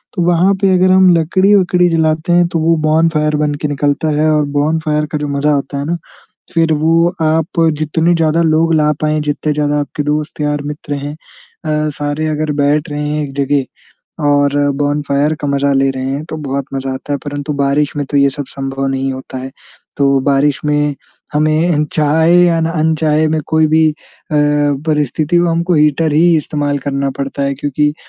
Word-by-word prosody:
तो 180 - -1
वहाँ 175 +3 +3
पे 195 -1 +3
अगर 185 +1 +3
हम 185 0 +5
लकड़ी-वकड़ी 180 +1 +3
जलाते 160 +1 0
हैं 175 0 +4
तो 165 -1 -2
वो 165 +1 +2
बोनफायर 155 -1 +1
बन 150 -1 0
के 150 - 0
निकलता 145 +2 -1
है 155 - +2
और 150 -1 +2
बोनफायर 150 0 0
का 150 - -1
जो 150 0 -3
मज़ा 145 +1 +1
आता 140 0 -4
है 140 - -3
ना 170 +2 -2 0.6
फ़िर 165 -1 +2
वो 165 +3 +2
आप 160 +1 0 0.2
जितने 160 +3 +1
ज़्यादा 165 0 +1
लोग 160 0 +2
ला 150 -1 +2
पाएँ 155 0 +1
जितने 150 +1 -2
ज़्यादा 150 0 0
आपके 145 +1 -4
दोस्त 150 +1 -3
यार 150 -1 -1
मित्र 145 0 -5
हैं 145 +1 -5
अ, 155 -1 -5
सारे 145 +1 -2
अगर 155 0 -1
बैठ 145 +1 +1
रहे 150 0 -3
हैं 150 0 -1
एक 135 - -8
जगह 140 0 +1 0.6
और 145 0 +2 0.2
बोनफायर 145 +1 0
का 145 - -2
मज़ा 140 0 +1
ले 135 0 +2
रहे 130 -1 -5
हैं 140 +3 -3
तो 155 - -4
बहुत 140 0 -2
मज़ा 135 0 -3
आता 135 +2 -5
है - - 0
परंतु 145 +1 -4
बारिश 140 +1 0
में 145 - -2
तो 145 - +1
ये 140 0 +4
सब 140 +1 -6
संभव 135 0 -4
नहीं 135 0 -1
होता 130 0 -8
है। 130 +1 -7 0.5
तो 140 -1 +3
बारिश 140 +1 +1
में 150 -1 0 0.4
हमें 155 +3 +2
अनचाहे 155 +2 +2
या 165 -1 +2
ना 165 +1 0
अनचाहे 155 0 +1
में 155 0 0
कोई 160 -1 +2
भी 160 0 +3
अ, 150 - -14 0.4
परिस्थिति 150 +1 0
हो 175 0 +2
हमको 170 +2 0
हीटर 150 +1 +2
ही 165 +2 +4
इस्तेमाल 145 -1 -2
करना 140 0 -1
पड़ता 140 0 -3
है 140 0 0
क्योंकि 145 +1 -1
150 Hz, 190 wpm, -15 LUFS, 145-160 Hz, 0.6 s, हम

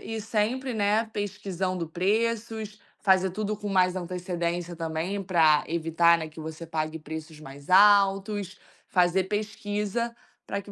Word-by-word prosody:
e 220 - -3
sempre, 230 +5 -1
né, 215 +1 +2
pesquisando 190 -4 -3
preços. 215 +4 -1 0.2
Fazer 190 -1 +3
tudo 215 +2 -2
com 205 0 -6
mais 185 -1 +3
antecedência 175 -1 -3
também, 165 +4 -3
para 160 -5 +4
evitar, 170 +1 +3
né, 160 -1 -5
que 155 +1 -13
você 160 +1 -7
pague 160 0 -3
preços 160 0 -8
mais 140 0 -12
altos. 200 0 +4 0.3
Fazer 180 0 +3
pesquisa, 210 +2 -2 0.3
para 200 - -3
que 205 - -12
190 Hz, 135 wpm, -27 LUFS, 170-210 Hz, 0.3 s, para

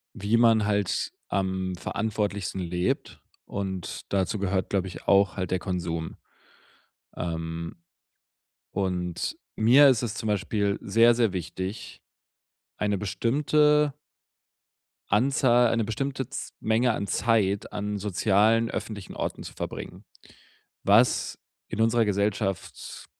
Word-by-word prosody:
wie 105 +2 +1
man 115 -2 +5
halt 100 -2 0 0.2
am 95 -1 -1
verantwortlichsten 100 -1 -2
lebt 90 +1 -2 0.3
und 95 -3 -5
dazu 100 +2 0
gehört, 95 -1 -1
glaube 95 -2 0
ich, 90 - -10
auch 100 0 +4
halt 90 -2 -3
der 95 - +1
Konsum. 85 -3 -3 1.0
Ähm, 80 0 -4 1.0
und 90 -3 -2 0.2
mir 130 +6 +7
ist 125 -4 +4
es 110 -3 -3
zum 110 - -4
Beispiel 100 0 0
sehr, 115 +4 +5
sehr 115 -4 +2
wichtig, 95 +3 -5 0.8
eine 105 -2 0
bestimmte 150 +7 +2 1.2
Anzahl, 120 +1 +4
eine 115 -1 +1
bestimmte 130 +3 -3
Z - - -6
Menge 115 +2 +2
an 100 - -3
Zeit 100 -2 +1
an 105 0 -3
sozialen 105 +3 +2
öffentlichen 100 -3 -6
Orten - - -4
zu - - -9
verbringen, - - -7 0.8
was 115 +5 +3 0.3
in 110 - -3
unserer 115 0 +3
Gesellschaft 100 -1 -2
105 Hz, 115 wpm, -26 LUFS, 95-115 Hz, 1.2 s, mir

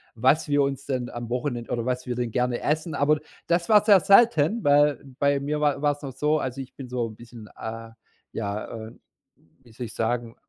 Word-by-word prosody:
was 130 +7 +2
wir 145 0 +3
uns 140 0 -2
denn 125 -3 -2
am 120 -1 -7
Wochenend 125 -1 -3
oder 115 -1 -1
was 125 0 -2
wir 125 -1 -3
denn 120 -1 -2
gerne 125 +1 0
essen. 155 +2 -1
Aber 150 +2 +3
d - - -14 0.3
das 170 +2 +1
war 210 -2 +6
sehr 205 -3 +7
selten, 200 -1 +4
weil 145 -1 +4 0.2
bei 140 0 +2
mir 150 +2 -2
wa 145 -2 +1
war's 145 -1 0
noch 140 - -6
so, 150 +4 +1
also, 130 -1 -4
ich 130 -1 -11
bin 130 -3 -9
so 125 -1 -1
'n 110 - -11
bisschen, 115 -1 -12
äh, 115 0 -6 0.4
ja, 105 -1 -3 0.2
äh, - - -11 0.7
wie 120 - -19
soll 120 +2 -6
ich - - -11
sagen, 115 0 -2
130 Hz, 220 wpm, -25 LUFS, 120-150 Hz, 0.7 s, sehr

